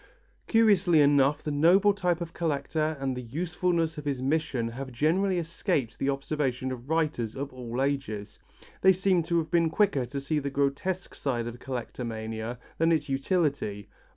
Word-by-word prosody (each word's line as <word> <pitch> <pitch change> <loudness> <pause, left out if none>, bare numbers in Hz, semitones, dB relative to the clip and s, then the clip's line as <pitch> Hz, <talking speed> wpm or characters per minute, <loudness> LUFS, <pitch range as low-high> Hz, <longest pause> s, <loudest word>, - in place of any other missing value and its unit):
Curiously 200 -7 +4
enough 145 0 +4
the 150 - -2
noble 180 +8 +5
type 180 -4 0
of 165 -1 -5
collector 155 0 -1
and 135 -1 -1
the 125 - -4
usefulness 165 +4 -1
of 150 - -9
his 140 -3 -1
mission 135 -4 0
have 130 +3 -7
generally 180 +9 +1
escaped 155 -7 -2
the 135 - 0
observation 135 -2 -1
of 125 +1 -7
writers 155 -9 0
of 140 0 -5
all 125 -1 -5
ages. 135 -8 -3 0.4
They 190 0 +7
seem 185 -1 +2
to 170 +1 0
have 160 -2 -1
been 170 -1 +3
quicker 155 - +1
to 140 +3 -4
see 150 +3 -1
the 140 -1 -3
grotesque 140 +7 -1
side 120 -4 -2
of 120 +1 -6
collectomania 115 -2 -5 0.2
than 165 +1 +4
its 150 -3 +1
utility. 135 - -1
145 Hz, 165 wpm, -28 LUFS, 130-165 Hz, 0.4 s, They